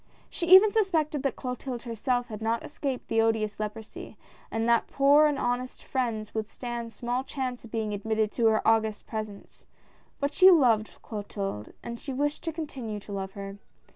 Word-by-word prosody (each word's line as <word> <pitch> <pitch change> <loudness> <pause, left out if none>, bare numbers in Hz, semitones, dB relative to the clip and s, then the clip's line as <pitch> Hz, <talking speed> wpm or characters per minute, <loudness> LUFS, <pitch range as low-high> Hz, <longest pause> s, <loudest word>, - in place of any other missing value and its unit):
She 340 - -3
even 380 +4 +9
suspected 325 - +1
that 275 - -1
Clotilde 250 -1 -5
herself 245 +1 -1
had 215 -1 -7
not 225 +1 -1
escaped 275 -3 -4
the 225 0 +2
odious 220 -2 0
leprosy, 215 +1 -6 0.3
and 225 +1 -1
that 235 -1 +3
poor 285 +2 +5
and 295 -2 0
honest 250 0 -2
friends 230 -5 -2
would 220 -1 -2
stand 235 -1 -5
small 245 +3 -2
chance 260 -3 -4
of 230 - -11
being 220 -2 -2
admitted 215 +1 0
to 230 -2 +2
her 220 -1 +2
august 220 -1 +2
presence, 215 -2 -7 0.5
but 285 +1 -1
she 375 0 +8
loved 245 - +5
Clotilde 200 - -5
and 235 0 -6
she 275 - -6
wished 290 +3 -1
to 330 - -1
continue 265 -9 -5
to 205 - -12
love 195 -1 -4
her. 200 0 -7
235 Hz, 175 wpm, -28 LUFS, 215-275 Hz, 0.5 s, even